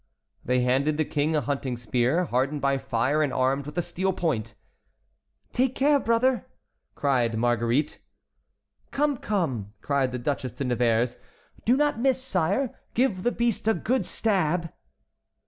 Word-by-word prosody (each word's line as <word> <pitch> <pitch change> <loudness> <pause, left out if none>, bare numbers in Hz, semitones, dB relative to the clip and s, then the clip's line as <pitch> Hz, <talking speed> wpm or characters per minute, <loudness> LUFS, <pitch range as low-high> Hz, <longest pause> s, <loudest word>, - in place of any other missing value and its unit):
They 125 +1 +1
handed 135 +5 +1
the 155 - +1
King 150 +2 0
a 150 - +2
hunting 135 -1 -2
spear 125 +9 +1
hardened 135 +2 0
by 140 -1 +1
fire 130 +3 0
and 145 -3 +1
armed 135 +2 0
with 150 - -8
a 175 - +1
steel 190 +3 -1
point. 120 - -2 1.0
"Take 260 +1 +1
care, 285 +1 +4
brother!" 235 -1 +1 0.5
cried 125 -5 +1
Marguerite. 120 +4 +1 0.9
"Come! 290 -1 0
come!" 135 - -2
cried 135 -1 0
the 125 - -3
Duchesse 130 -1 -3
de - - -4
Nevers. 120 -1 +1 0.5
"Do 245 +3 +4
not 295 -4 +1
miss, 260 +1 +2
sire. 225 +1 0 0.2
Give 225 -7 +1
the 240 - +1
beast 235 -3 -1
a 225 - +4
good 255 +3 0
stab!" 180 -6 0
150 Hz, 145 wpm, -26 LUFS, -, 1.0 s, care